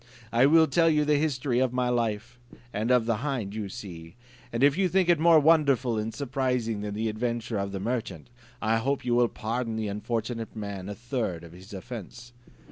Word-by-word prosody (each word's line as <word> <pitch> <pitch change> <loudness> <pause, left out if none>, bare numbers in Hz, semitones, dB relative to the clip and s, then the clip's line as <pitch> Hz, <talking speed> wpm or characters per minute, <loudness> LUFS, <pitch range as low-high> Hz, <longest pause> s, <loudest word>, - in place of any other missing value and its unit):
I 120 +3 +5
will 160 +2 +6
tell 165 +1 +3
you 150 -1 +2
the 150 0 +3
history 135 -4 0
of 130 -1 +1
my 125 0 +1
life, 120 0 -2 0.3
and 110 +3 -1
of 125 -2 +4
the 115 -2 +1
hind 120 -6 -3
you 105 -2 -4
see; 85 -3 -9 0.4
and 115 +3 -1
if 140 0 +5
you 190 0 +1
think 185 0 +2
it 170 -3 +4
more 165 0 +6
wonderful 140 -7 +3
and 110 +1 -3
surprising 125 -5 -1
than 105 0 -4
the 110 +1 -1
adventure 115 0 -2
of 100 0 -3
the 95 - -4
merchant, 105 -5 -4 0.3
I 110 +1 +2
hope 135 +3 -1
you 120 - +1
will 120 0 +4
pardon 115 +1 -3
the 110 -2 -2
unfortunate 115 +2 -3
man 100 -3 -5
a 105 - -5
third 115 -8 -3
of 85 - -11
his 95 +5 -14
offence." 120 +3 -9
120 Hz, 205 wpm, -27 LUFS, 105-130 Hz, 0.4 s, will